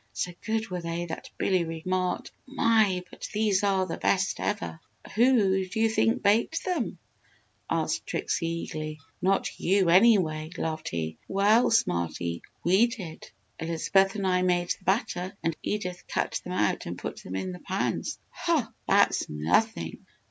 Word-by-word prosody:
So 180 - -2
good 220 -2 -1
were 180 -1 -3
they, 170 +1 -3
that 160 - -7
Billy 185 -2 +2
remarked, 180 +3 -2 0.2
"My! 220 -8 +3
But - - -7
these 210 -2 +2
are 195 -2 +2
the 165 - -4
best 200 +1 +1
ever!" 205 -5 -2 0.3
"Who 215 -5 +4
do 185 +4 -5
you 225 0 +4
think 225 +1 +2
baked 230 +11 +2
them?" 345 -10 -1 0.7
asked - - -1
Trixie, 165 - -1
eagerly. 155 -2 -4 0.2
"Not 195 +1 +1
you, 190 -1 +3
anyway!" 175 -6 +4
laughed 160 -1 -3
he. 80 -1 -4
"Well, 205 +5 +4
Smarty, 85 - 0 0.2
we 190 +7 +5
did! 190 -10 -8 0.3
Elizabeth 190 +4 +2
and 200 -2 -2
I 180 -1 +2
made 175 -1 +1
the 185 - -4
batter 190 -1 -1
and 165 -1 0
Edith 180 -4 -3
cut - - -1
them - - -5
out - - 0
and - - -5
put - - -6
them 90 - -7
in 95 -1 -2
the 90 - -8
pans." - - -2
"Hoh! - - +1 0.2
That's - - +3
nothing! 80 - 0
185 Hz, 155 wpm, -27 LUFS, 165-210 Hz, 0.7 s, we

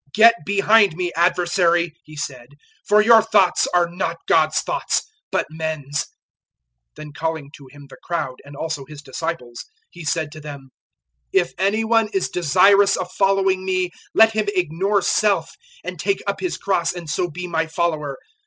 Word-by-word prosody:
"Get 230 +2 +8
behind 200 -1 +4
me, 175 0 -3
Adversary," 175 -1 +2
He 155 - -14
said, 130 -2 -7 0.3
"for 210 +1 +5
your 225 0 +7
thoughts 210 -4 +2
are 175 -1 +2
not 170 -1 -3
God's 155 -1 +3
thoughts, - - -1 0.3
but - - 0
men's." 155 -3 -4
008:034 - - 0 0.9
Then 155 -1 -10
calling 160 -2 -4
to 140 -3 -15
Him 145 0 -14
the - - -14
crowd 150 -7 -4
and 140 0 -13
also 160 -1 -4
His 145 +1 -12
disciples, 135 -4 -5 0.3
He 175 - -11
said 155 0 -2
to 155 0 -11
them, 140 -3 -10 0.6
"If 175 -2 +1
any 200 +4 +1
one 225 0 +2
is 195 - 0
desirous 195 +5 +4
of 180 0 -5
following 195 -1 +1
me, 185 -1 -1 0.2
let 225 0 +6
him 215 -1 -1
ignore 185 +3 0
self 200 -6 +1 0.3
and - - -7
take 395 - -1
up - - -2
his 365 - -3
cross, 180 -4 0
and 175 -2 -8
so 175 +4 -1
be 180 +3 -6
my 165 -2 -1
follower. 155 -4 -2
170 Hz, 170 wpm, -21 LUFS, 155-195 Hz, 0.9 s, Get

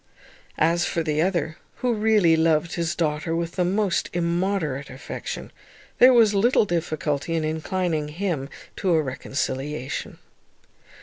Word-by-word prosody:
As 170 +2 +2
for 165 - -1
the 155 -1 0
other, 170 -3 0 0.2
who 250 -1 0
really 210 -6 +4
loved 160 +1 +2
his 170 -1 -1
daughter 160 0 -1
with 170 0 -2
the 180 - 0
most 195 +1 0
immoderate 170 -5 -1
affection, 130 +1 -7 0.5
there 255 +1 +9
was 230 -4 +5
little 220 +3 +3
difficulty 160 -3 -2
in 160 - 0
inclining 160 0 -1
him 155 -4 -3 0.3
to 185 -3 +1
a 160 - +3
reconciliation. 135 +1 -4
165 Hz, 130 wpm, -24 LUFS, 155-185 Hz, 0.5 s, there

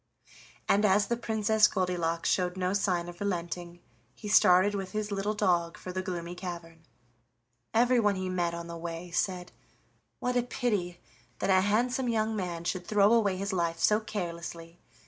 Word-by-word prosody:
And, 205 - +3
as 205 0 +4
the 235 - -1
Princess 220 -2 +2
Goldilocks 175 -3 -1
showed 180 0 +1
no 185 0 0
sign 180 -4 0
of 175 0 -10
relenting, 175 -2 -4 0.3
he 210 - -9
started 185 0 +5
with 195 -2 -4
his 215 0 -3
little 200 +2 -1
dog 170 -4 +1
for 185 - -7
the 185 +1 -2
Gloomy 175 -2 -5
Cavern. 170 -3 -8 0.8
Everyone 230 -3 +3
he 185 0 -3
met 175 -2 -1
on 170 0 -6
the 170 0 -7
way 170 +1 -6
said: 180 0 -2 0.7
"What 250 0 -2
a 245 - +4
pity 210 -8 -2 0.4
that - - 0
a 185 0 +5
handsome 240 +5 +1
young 220 -1 0
man 175 -4 -3
should 175 +1 -3
throw 210 +1 +4
away 205 -5 +2
his 200 +1 -3
life 170 -2 0
so 210 +5 +3
carelessly! 170 -4 -6
185 Hz, 165 wpm, -29 LUFS, 175-210 Hz, 0.8 s, started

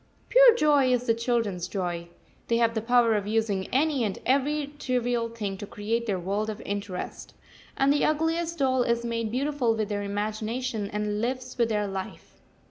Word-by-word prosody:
Pure - - +7
joy 290 - +4
is 250 0 +1
the 230 - +3
children's 230 -6 -1
joy. 175 -3 -3 0.4
They 230 - +2
have 230 -1 +2
the 220 - -1
power 235 0 +4
of 205 -2 -1
using 210 -3 0
any 280 -1 +1
and 205 -3 -2
every 285 +2 +1
trivial 245 -3 0
thing 205 -4 -5
to 205 - -6
create 225 +4 -2
their 200 -3 0
world 200 +4 -2
of 215 0 -5
interest, 200 -2 -5 0.4
and 275 +1 +4
the 290 - +1
ugliest 325 +2 0
doll 260 -3 +2
is 235 -1 0
made 230 -1 -2
beautiful 260 -1 0
with 215 -1 -2
their 205 -1 -2
imagination 215 +2 -3
and 210 0 -2
lives 255 +1 -3
with 235 -2 +1
their 210 -1 0
life. 195 -1 -6
230 Hz, 180 wpm, -27 LUFS, 210-255 Hz, 0.4 s, Pure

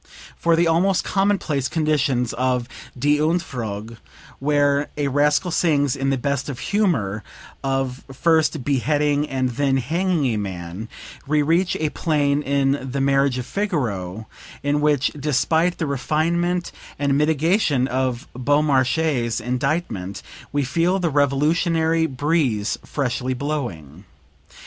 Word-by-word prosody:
From 170 0 +2
the 170 +1 +3
almost 175 +3 +2
commonplace 195 -9 0
conditions 145 -6 +1
of 125 -1 0 0.3
"Die 145 +3 +2
Entfuhrung," 120 - -2 0.4
where 145 0 +2
a 145 -2 0
rascal 150 +6 +2
sings 145 -6 +2
in 135 0 -1
the 135 - +1
best 140 +2 -2
of 135 - -5
humor 120 - 0 0.4
of 135 -1 -2
first 160 0 +2
beheading 145 +2 +1
and 130 -1 0
then 135 +2 +1
hanging 165 +4 0
a - - -1
man, 95 +1 -5 0.4
we 150 +1 +2
reach 170 +4 +2
a 155 -1 -1
plane 145 -3 +1
in 140 -1 0
"The 140 - -2
Marriage 135 -1 +2
of 125 - -4
Figaro," 110 - -2 0.4
in 145 +1 +1
which 145 -3 +2
despite 160 +5 +1
the 160 - -1
refinement 170 +6 0 0.3
and 140 -1 +1
mitigation 150 - +2
of 130 -1 -2
Beaumarchais's 135 -2 +1
indictment 125 - -2 0.3
we 145 0 0
feel 170 +7 +1
the 175 -4 0
revolutionary 160 +3 +2
breeze 135 -6 0
freshly 130 -2 -2
blowing. 110 - -4
145 Hz, 125 wpm, -22 LUFS, 125-160 Hz, 0.4 s, the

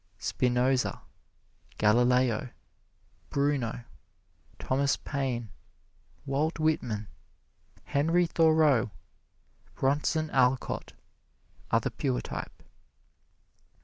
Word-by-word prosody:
Spinoza, 125 +4 0 0.7
Galileo, 125 +2 +3 0.8
Bruno, 140 -5 -1 0.7
Thomas 135 +1 0
Paine, 125 -6 -3 0.7
Walt 145 +4 0
Whitman, 125 -10 -1 0.8
Henry 165 +5 +2
Thoreau, 155 -8 +3 0.9
Bronson 150 +3 0
Alcott, 130 -1 +1 0.8
are - - +3
the - - -2
pure 60 - -1
type. - - -7
135 Hz, 65 wpm, -29 LUFS, 120-150 Hz, 0.9 s, Galileo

